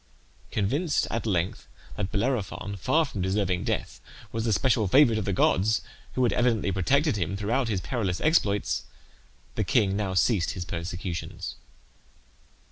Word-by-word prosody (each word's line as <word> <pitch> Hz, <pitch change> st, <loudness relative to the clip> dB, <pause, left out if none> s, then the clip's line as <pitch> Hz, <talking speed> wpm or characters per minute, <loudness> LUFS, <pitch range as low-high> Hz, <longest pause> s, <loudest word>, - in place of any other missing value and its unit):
Convinced 140 Hz, -, 0 dB
at 115 Hz, 0 st, -2 dB
length 90 Hz, -3 st, -1 dB, 0.3 s
that 100 Hz, 0 st, -3 dB
Bellerophon, 100 Hz, -3 st, -1 dB
far 155 Hz, -, +2 dB
from 105 Hz, -9 st, -5 dB
deserving 95 Hz, -1 st, 0 dB
death, -, -, -3 dB, 0.3 s
was 115 Hz, 0 st, -2 dB
the 115 Hz, -, +1 dB
special 115 Hz, -1 st, +2 dB
favourite 120 Hz, 0 st, +5 dB
of 105 Hz, -, -3 dB
the -, -, 0 dB
gods, 100 Hz, +3 st, +2 dB, 0.3 s
who 130 Hz, -, +2 dB
had 120 Hz, -, +3 dB
evidently 115 Hz, -5 st, +1 dB
protected 135 Hz, -, +2 dB
him 95 Hz, +1 st, -2 dB
throughout 115 Hz, +5 st, 0 dB
his 100 Hz, -5 st, -1 dB
perilous 90 Hz, +2 st, -2 dB
exploits, 105 Hz, -11 st, +1 dB, 0.7 s
the -, -, -1 dB
king 95 Hz, -2 st, +2 dB
now 100 Hz, -2 st, -1 dB
ceased 95 Hz, 0 st, +2 dB
his 90 Hz, -, -4 dB
persecutions. 85 Hz, 0 st, -5 dB
105 Hz, 145 wpm, -27 LUFS, 95-120 Hz, 0.7 s, favourite